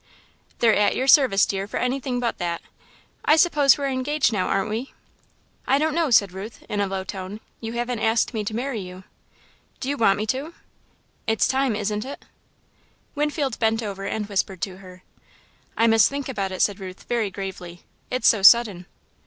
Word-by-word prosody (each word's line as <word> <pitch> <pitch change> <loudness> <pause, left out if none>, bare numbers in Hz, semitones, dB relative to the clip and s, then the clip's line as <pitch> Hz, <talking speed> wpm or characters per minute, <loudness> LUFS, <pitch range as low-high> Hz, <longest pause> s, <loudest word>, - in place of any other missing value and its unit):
"They're 230 -2 +4
at 205 - +2
your 260 - -1
service, 265 -8 +5
dear, 195 0 -3
for - - -4
anything 250 0 -1
but 240 -1 -2
that. 170 -2 -3 0.6
I 305 - +5
suppose 300 -4 +4
we're 280 -1 -2
engaged 265 -1 0
now, 185 -3 0
aren't 195 +2 -1
we?" 235 +5 -5 0.7
"I 270 - +4
don't 310 +1 0
know," 330 -2 +1
said 200 -6 +4
Ruth, 195 +5 -9
in 205 - -2
a 200 - 0
low 190 0 -3
tone; 190 +1 -7 0.2
"you 225 0 -6
haven't 240 0 -2
asked 225 +2 +1
me 220 -2 -2
to 215 - -4
marry 250 -1 -3
you." 185 0 -10 0.8
"Do 260 - -4
you 285 - -1
want 205 -5 +3
me 210 - -2
to?" 275 +8 -3 0.7
"It's 220 0 +2
time, 265 -3 +1
isn't 210 0 -2
it?" 275 +3 -9 0.9
Winfield 295 -3 -2
bent 225 0 +1
over 195 -2 -5
and 210 +1 -2
whispered 195 -2 -2
to 185 -2 -4
her. 185 -1 -14 0.7
"I 230 - +4
must 225 -1 +5
think 280 -1 -4
about 200 -7 -3
it," 185 - 0
said 205 0 0
Ruth, 185 -1 -9
very 230 -4 -1
gravely, 185 -3 -8 0.3
"it's 250 -2 +1
so 215 - +4
sudden." 205 -4 +5
220 Hz, 185 wpm, -23 LUFS, 195-260 Hz, 0.9 s, service